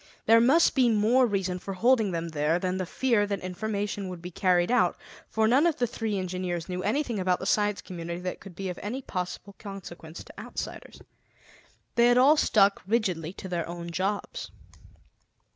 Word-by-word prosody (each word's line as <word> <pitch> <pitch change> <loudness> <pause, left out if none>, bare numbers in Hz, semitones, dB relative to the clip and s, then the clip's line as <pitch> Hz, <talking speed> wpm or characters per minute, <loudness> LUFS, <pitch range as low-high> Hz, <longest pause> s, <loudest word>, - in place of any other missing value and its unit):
There 230 +1 +6
must 285 +8 +5
be 255 -3 +4
more 230 +4 +4
reason 190 -3 -1
for 195 +1 -6
holding 230 +1 +3
them 170 -1 -3
there 155 +1 +1
than 185 0 -2
the 185 -2 -3
fear 230 -1 +1
that 200 -1 -2
information 200 +1 -3
would 180 -1 -7
be 175 +2 -8
carried 180 +1 +2
out, 250 - +3 0.3
for 220 0 +2
none 270 +8 +4
of 330 - +1
the 245 - +2
three 225 -3 -3
engineers 180 -2 -3
knew 180 -1 -3
anything 235 +1 -1
about 185 -1 +1
the - - -7
Science 205 +1 +1
Community 170 -2 -6
that 180 0 -4
could 195 -3 -12
be 195 +1 -4
of 180 - -5
any 250 +6 -4
possible 185 +1 -5
consequence 175 -5 -9
to - - -13
outsiders. - - -7 0.9
They 235 0 +5
had 245 0 +5
all 275 +5 +7
stuck 200 -9 +3
rigidly 185 -8 0
to 190 - -8
their 175 -2 -3
own 170 0 -6
jobs. 200 - -3
195 Hz, 185 wpm, -27 LUFS, 180-225 Hz, 0.9 s, all